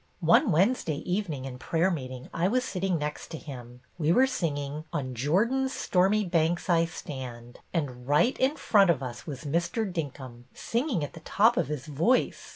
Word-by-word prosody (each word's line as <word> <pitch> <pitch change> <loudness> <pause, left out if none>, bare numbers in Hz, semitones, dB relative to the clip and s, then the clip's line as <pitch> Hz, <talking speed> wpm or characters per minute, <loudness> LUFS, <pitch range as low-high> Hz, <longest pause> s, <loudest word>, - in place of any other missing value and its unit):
One 285 - +4
Wednesday 175 - +2
evening 175 -8 -2
in 125 -1 -7
prayer 170 +6 +1
meeting 130 -5 -5
I 170 +2 +1
was 250 +5 +1
sitting 190 -5 -1
next 150 0 -4
to 160 - -7
him. 125 -5 -10 0.2
We 155 0 +2
were 255 +9 +5
singing 150 - -3
' - - -37
On 135 -6 -3
Jordan's 225 - +1
Stormy 195 +3 +2
Banks 170 0 +1
I 165 -1 +4
Stand,' 125 -7 -8
and 130 -7 -3
right 150 - +3
in 265 +3 +2
front 200 -4 +4
of 145 -6 +2
us 120 -1 -7
was 135 -4 -6
Mr. 170 - 0
Dinkum, 135 - -6
singing 235 - -1
at 145 - -5
the - - -10
top 220 +8 +3
of - - +1
his 150 -4 -4
voice. 160 - +1
165 Hz, 180 wpm, -28 LUFS, 140-195 Hz, 0.2 s, were